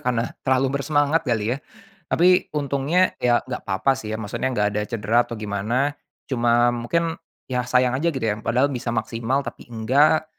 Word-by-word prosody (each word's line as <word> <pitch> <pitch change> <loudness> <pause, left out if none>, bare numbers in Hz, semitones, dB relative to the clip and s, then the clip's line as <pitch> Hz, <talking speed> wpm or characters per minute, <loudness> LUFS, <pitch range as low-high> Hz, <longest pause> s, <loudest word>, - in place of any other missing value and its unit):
karena 125 -4 -1
terlalu 135 +1 +1
bersemangat 145 +2 +2
kali 115 -1 0
ya? - - -10 0.5
Tapi, 180 +2 +4
untungnya, 145 +6 +1
ya 120 -1 +3
enggak 130 -1 -5
apa-apa 95 +8 +1
sih 110 -4 -6
ya, - - -1
maksudnya 110 +5 -2
enggak 105 -4 +1
ada 105 0 -1
cedera 115 +1 +1
atau - - -10
gimana, 110 +7 -1 0.4
cuma 120 -2 +3
mungkin, 165 +8 -1 0.3
ya 125 -1 -1
sayang 125 0 +3
aja 170 +3 +1
gitu 135 - -4
ya, 105 -1 +1
padahal 125 +5 +2
bisa 125 -1 -4
maksimal 115 +4 -1
tapi - - -8
enggak. 140 +8 +3
125 Hz, 175 wpm, -23 LUFS, 115-140 Hz, 0.5 s, Tapi